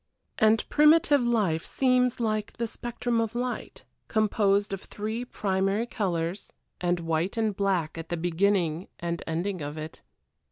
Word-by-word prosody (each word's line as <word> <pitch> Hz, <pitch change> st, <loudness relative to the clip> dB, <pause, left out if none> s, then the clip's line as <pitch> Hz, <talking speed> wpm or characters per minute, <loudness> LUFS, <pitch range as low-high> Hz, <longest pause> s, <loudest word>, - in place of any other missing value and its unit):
And 220 Hz, 0 st, +4 dB
primitive 300 Hz, -1 st, +5 dB
life 210 Hz, -10 st, +1 dB
seems 250 Hz, -2 st, +2 dB
like 215 Hz, -2 st, -1 dB
the 235 Hz, -, -2 dB
spectrum 240 Hz, 0 st, -2 dB
of 225 Hz, 0 st, -3 dB
light 245 Hz, 0 st, -4 dB, 0.2 s
composed 205 Hz, -2 st, +2 dB
of 195 Hz, -, -4 dB
three 220 Hz, +3 st, -4 dB
primary 195 Hz, -1 st, 0 dB
colors, 185 Hz, -5 st, -2 dB, 0.3 s
and 175 Hz, -1 st, +1 dB
white 165 Hz, +5 st, -1 dB
and 220 Hz, -3 st, +1 dB
black 185 Hz, -5 st, 0 dB
at 165 Hz, -, -8 dB
the 175 Hz, -, -2 dB
beginning 175 Hz, 0 st, +1 dB
and 170 Hz, 0 st, -3 dB
ending 175 Hz, +3 st, -2 dB
of 145 Hz, +1 st, -5 dB
it. 155 Hz, +1 st, -7 dB
200 Hz, 145 wpm, -27 LUFS, 175-230 Hz, 0.3 s, primitive